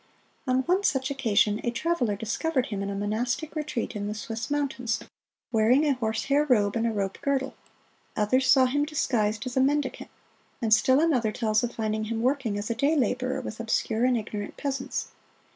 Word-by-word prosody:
On 255 0 +3
one 365 +8 +1
such 265 -7 +1
occasion 220 -6 +2
a - - 0
traveler 245 -3 0
discovered 250 +7 -1
him 200 -3 -4
in 200 - -3
a 200 - -3
monastic 235 +9 -2
retreat 300 -7 -3
in 205 0 -3
the 210 - -3
Swiss 225 +1 -5
Mountains, 270 -5 -1 0.5
wearing 240 +6 +4
a 290 - +3
horsehair 250 +4 0
robe 215 -8 +2
and 230 0 +1
a - - 0
rope 195 -2 -3
girdle; 270 -1 0 0.6
others 255 +5 +2
saw 265 -2 +7
him 290 +3 +1
disguised 230 -7 0
as 255 - -5
a - - +3
mendicant; 280 0 0 0.5
and 225 -3 +2
still 260 +5 +4
another 260 -9 +2
tells 215 -1 +1
of 240 - -3
finding 215 -1 -1
him 225 +1 -3
working 255 -5 0
as 205 +3 -3
a - - +2
day 280 +7 +1
laborer 255 -1 0
with 220 - -7
obscure 225 0 0
and 250 -1 +3
ignorant 210 -2 -5
peasants. 275 -2 -3
240 Hz, 185 wpm, -27 LUFS, 215-270 Hz, 0.6 s, saw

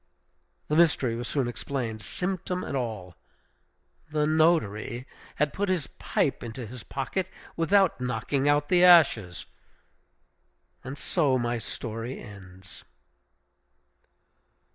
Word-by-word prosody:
The 150 - 0
mystery 150 -8 +3
was 120 +1 -4
soon 135 -4 0
explained, 120 -3 -4
symptom 180 - -3
and - - -4
all. 110 -9 -4 0.9
The 150 -1 +1
notary 150 -7 +1 0.3
had 150 0 0
put 200 0 -1
his 180 -6 0
pipe - - 0
into 120 +1 -6
his 120 +2 -9
pocket 155 - -3 0.3
without 190 -2 +3
knocking 125 +3 0
out 145 0 +3
the 180 0 +5
ashes! 135 - +5 1.4
And 135 +3 -7
so 145 -7 +1
my 120 -1 -1
story 115 +3 -5
ends. 95 -3 -12
130 Hz, 110 wpm, -27 LUFS, 115-160 Hz, 1.4 s, the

